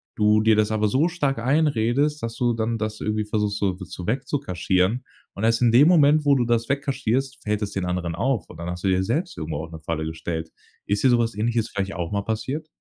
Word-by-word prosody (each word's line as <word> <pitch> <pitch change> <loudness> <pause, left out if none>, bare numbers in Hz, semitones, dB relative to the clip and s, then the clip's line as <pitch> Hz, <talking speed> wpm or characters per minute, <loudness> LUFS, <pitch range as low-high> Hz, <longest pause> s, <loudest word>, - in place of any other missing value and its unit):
du 105 0 +4
dir 110 0 +4
das 110 0 +2
aber 110 0 +1
so 140 +10 +2
stark 145 -7 -1
einredest, 140 +1 +1
dass 115 0 -4
du 120 0 +1
dann 115 0 -1
das 110 0 -4
irgendwie 105 0 -1
versuchst, 105 -1 -1
so, 100 -2 +1
zu 90 -1 -8
weg 130 +4 -1
zu 145 - 0
kaschieren. 95 +1 0 0.3
Und 100 - -3
erst 115 +1 +2
in 120 -2 +4
dem 130 +6 +6
Moment, 155 -3 +5
wo 140 -1 +5
du 125 - +2
das 115 -1 +1
weg 140 +1 0
kaschierst, 135 0 -1
fällt 105 0 -1
es 100 -1 -2
den 95 -2 -2
anderen 90 -2 -2
auf, 115 -2 -1
und - - -12
dann 85 +1 -5
hast 90 0 -6
du 95 - +2
dir 95 0 +2
selbst 165 - -2
irgendwo 80 -1 -4
auch 80 - -9
'ne 80 - -8
Falle 80 0 -3
gestellt. 80 0 -4 0.4
Ist 100 0 0
dir - - +7
so 120 - +5
was 115 -1 0
Ähnliches 115 +1 0
vielleicht 100 -1 -3
auch 85 -1 -4
mal 100 -1 -1
passiert? 130 +9 -3
110 Hz, 250 wpm, -24 LUFS, 95-130 Hz, 0.4 s, dir